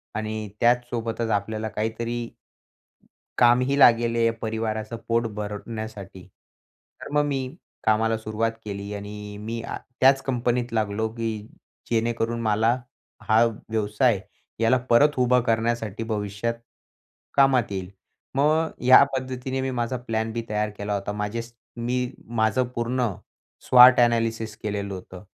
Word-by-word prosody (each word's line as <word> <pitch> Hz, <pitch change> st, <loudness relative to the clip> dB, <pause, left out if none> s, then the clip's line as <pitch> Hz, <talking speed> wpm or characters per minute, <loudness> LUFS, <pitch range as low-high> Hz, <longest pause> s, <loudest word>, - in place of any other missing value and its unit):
आणि 110 Hz, -1 st, -3 dB
त्याचसोबतच 120 Hz, -1 st, 0 dB
आपल्याला 110 Hz, +2 st, -1 dB
काहीतरी 115 Hz, +3 st, -3 dB, 1.1 s
कामही 125 Hz, +3 st, +4 dB
लागेल 115 Hz, -2 st, +5 dB
या 115 Hz, 0 st, +2 dB
परिवाराचं 110 Hz, 0 st, -3 dB
पोट 115 Hz, 0 st, +1 dB
भरण्यासाठी. 105 Hz, -2 st, -6 dB, 0.7 s
तर -, -, -7 dB
मग 150 Hz, 0 st, +4 dB
मी 135 Hz, 0 st, -3 dB, 0.3 s
कामाला 110 Hz, +1 st, +2 dB
सुरुवात 110 Hz, +1 st, -1 dB
केली 100 Hz, 0 st, -5 dB
आणि 105 Hz, 0 st, -7 dB
मी 115 Hz, +1 st, -4 dB
आ -, -, -5 dB, 0.2 s
त्याच 135 Hz, +1 st, +5 dB
कंपनीत 120 Hz, -2 st, -1 dB
लागलो, 110 Hz, 0 st, 0 dB
की 110 Hz, -2 st, -4 dB, 0.4 s
जेणेकरून 115 Hz, 0 st, 0 dB
मला 110 Hz, +2 st, +2 dB, 0.5 s
हा 110 Hz, +2 st, +6 dB, 0.3 s
व्यवसाय 110 Hz, +1 st, +1 dB, 0.4 s
याला 115 Hz, +3 st, +4 dB
परत 130 Hz, +6 st, +6 dB
उभा 125 Hz, 0 st, +4 dB
करण्यासाठी 115 Hz, -2 st, -1 dB
भविष्यात 105 Hz, +1 st, -2 dB, 0.8 s
कामात 130 Hz, -5 st, +4 dB
येईल. 95 Hz, -2 st, -4 dB, 0.5 s
मग 155 Hz, +3 st, +2 dB
या 130 Hz, +2 st, +9 dB
पद्धतीने 130 Hz, 0 st, -3 dB
मी 135 Hz, -, -1 dB
माझा 120 Hz, 0 st, -2 dB
प्लॅन 115 Hz, -2 st, -2 dB
बी 115 Hz, -, -2 dB
तयार 105 Hz, 0 st, 0 dB
केला 105 Hz, 0 st, -3 dB
होता. 100 Hz, 0 st, -2 dB
माझ्या 105 Hz, +2 st, -3 dB
स 115 Hz, -, -15 dB, 0.2 s
मी 125 Hz, +1 st, -1 dB
माझं 110 Hz, +1 st, +1 dB
पूर्ण 120 Hz, +1 st, 0 dB, 0.5 s
स्वॉट 125 Hz, 0 st, +8 dB
अ‍ॅनालिसिस 115 Hz, -2 st, +1 dB
केलेलं 100 Hz, -1 st, -3 dB
होतं. 95 Hz, 0 st, -9 dB
115 Hz, 125 wpm, -25 LUFS, 110-120 Hz, 1.1 s, या